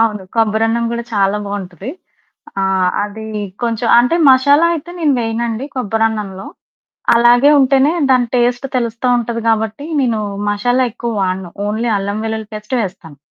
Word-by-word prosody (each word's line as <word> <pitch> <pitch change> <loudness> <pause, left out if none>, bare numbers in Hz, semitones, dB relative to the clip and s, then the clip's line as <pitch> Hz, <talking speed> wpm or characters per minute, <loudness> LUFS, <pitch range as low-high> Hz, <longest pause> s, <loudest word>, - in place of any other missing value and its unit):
అవును. 215 -3 +1
కొబ్బరన్నం 225 +1 +1
గూడా 235 0 -3
చాలా 195 0 +2
బావుంటది. 200 +2 -6 0.7
ఆహ్, 190 -1 +1
అది 215 +1 -8 0.4
కొంచెం 230 0 -1
అంటే, 245 +7 +3
మషాలా 285 +5 +5
అయితే 330 +1 -7
నేను 300 -5 +2
వేయనండి 230 +2 -2
కొబ్బరన్నంలో. 215 -4 -2 0.7
అలాగే 240 +4 +5
ఉంటేనే 270 +3 +3 0.2
దాని 250 -2 +3
టేస్ట్ 245 +2 +1
తెలుస్తు 230 0 -3
ఉంటది 235 0 -3
గాబట్టి, 225 +6 -1
నేను 235 -4 0 0.3
మషాలా 245 +5 +1
ఎక్కువ 235 -1 -4
వాడను. 185 -2 -2 0.2
ఓన్లీ 225 +3 -1
అల్లం 200 +2 -3
వెల్లుల్లి 220 -1 -4
పేస్టే 215 +4 -4
వేస్తాను. 175 -6 -8
225 Hz, 135 wpm, -16 LUFS, 205-245 Hz, 0.7 s, మషాలా